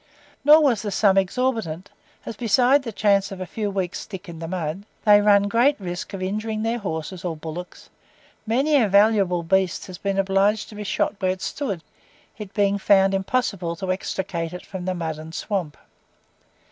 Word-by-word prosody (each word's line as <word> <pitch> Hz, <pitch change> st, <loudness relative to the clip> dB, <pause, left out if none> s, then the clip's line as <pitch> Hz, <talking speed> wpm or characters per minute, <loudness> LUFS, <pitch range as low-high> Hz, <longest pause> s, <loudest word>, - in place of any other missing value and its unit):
Nor 305 Hz, +2 st, +7 dB
was 245 Hz, -8 st, +2 dB
the 210 Hz, -, -3 dB
sum 200 Hz, -1 st, +3 dB
exorbitant, 195 Hz, -3 st, -1 dB, 0.3 s
as 230 Hz, -, -6 dB
besides 250 Hz, +5 st, +3 dB
the 230 Hz, -, -4 dB
chance 200 Hz, -1 st, +2 dB
of 195 Hz, -, -7 dB
a 185 Hz, -, -4 dB
few 210 Hz, +3 st, -3 dB
weeks' 190 Hz, -2 st, -3 dB
stick 190 Hz, -1 st, -9 dB
in 165 Hz, -2 st, -9 dB
the 165 Hz, -, -5 dB
mud, 175 Hz, +1 st, -4 dB, 0.2 s
they 205 Hz, -1 st, +7 dB
run 205 Hz, -1 st, +5 dB
great 235 Hz, +7 st, +2 dB
risk 180 Hz, +1 st, -5 dB
of 185 Hz, -, -5 dB
injuring 215 Hz, +3 st, -2 dB
their 230 Hz, +1 st, -1 dB
horses 175 Hz, -2 st, -5 dB
or 170 Hz, -3 st, -3 dB
bullocks; 165 Hz, +3 st, -8 dB, 0.6 s
many 275 Hz, +7 st, +3 dB
a 220 Hz, -, +3 dB
valuable 200 Hz, -3 st, +3 dB
beast 190 Hz, +1 st, +1 dB
has 185 Hz, -2 st, -10 dB
been 195 Hz, -1 st, -2 dB
obliged 195 Hz, +2 st, +1 dB
to -, -, -12 dB
be 210 Hz, 0 st, -6 dB
shot 205 Hz, +1 st, -1 dB
where 185 Hz, -, +1 dB
it 185 Hz, 0 st, -2 dB
stood, 200 Hz, -, -3 dB, 0.6 s
it 210 Hz, -3 st, -7 dB
being 200 Hz, -1 st, +2 dB
found 195 Hz, -1 st, +4 dB
impossible 195 Hz, -4 st, -1 dB
to 185 Hz, +2 st, -3 dB
extricate 185 Hz, -3 st, -3 dB
it 180 Hz, -, -8 dB
from 185 Hz, -2 st, -7 dB
the 185 Hz, 0 st, -1 dB
mud 160 Hz, -3 st, -4 dB
and 160 Hz, +1 st, -9 dB
swamp. 185 Hz, -8 st, -3 dB
195 Hz, 185 wpm, -23 LUFS, 180-215 Hz, 0.6 s, Nor